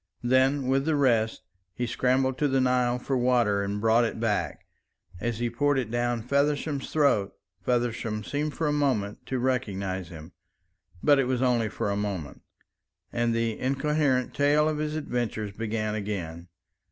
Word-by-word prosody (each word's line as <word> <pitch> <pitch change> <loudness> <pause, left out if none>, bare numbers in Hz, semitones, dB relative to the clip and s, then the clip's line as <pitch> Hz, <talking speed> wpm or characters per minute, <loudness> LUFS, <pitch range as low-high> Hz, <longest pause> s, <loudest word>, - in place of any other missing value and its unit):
Then 130 +2 +3
with 135 +2 +1
the 160 -1 +2
rest 115 -6 +2 0.3
he 120 - -1
scrambled 130 +2 +1
to 150 - +3
the 135 -1 +2
Nile 125 -1 +2
for 135 +2 -2
water 120 -5 +2
and 100 +1 -2
brought 115 +2 +4
it 115 - -2
back. 110 -2 -1 0.5
As 120 0 -2
he 120 +1 0
poured 145 +4 +1
it 120 -4 -2
down 120 -1 0
Feversham's 140 +2 0
throat, 140 -10 +2 0.3
Feversham 120 -3 -1
seemed 145 +5 -2
for 165 - -1
a 150 - +1
moment 125 -9 0
to 130 - -1
recognise 100 -8 -2
him. 80 0 -10 0.7
But 145 -2 +5
it 135 - +2
was 130 0 0
only 120 -3 +2
for 100 - -2
a - - 0
moment, 100 -8 -4 0.7
and 120 -1 +1
the 115 -1 -1
incoherent 135 -1 +1
tale 145 +2 +3
of 155 -1 -1
his 155 0 -2
adventures 120 -8 -2
began 110 0 -2
again. 90 -5 -4
120 Hz, 165 wpm, -27 LUFS, 110-135 Hz, 0.7 s, But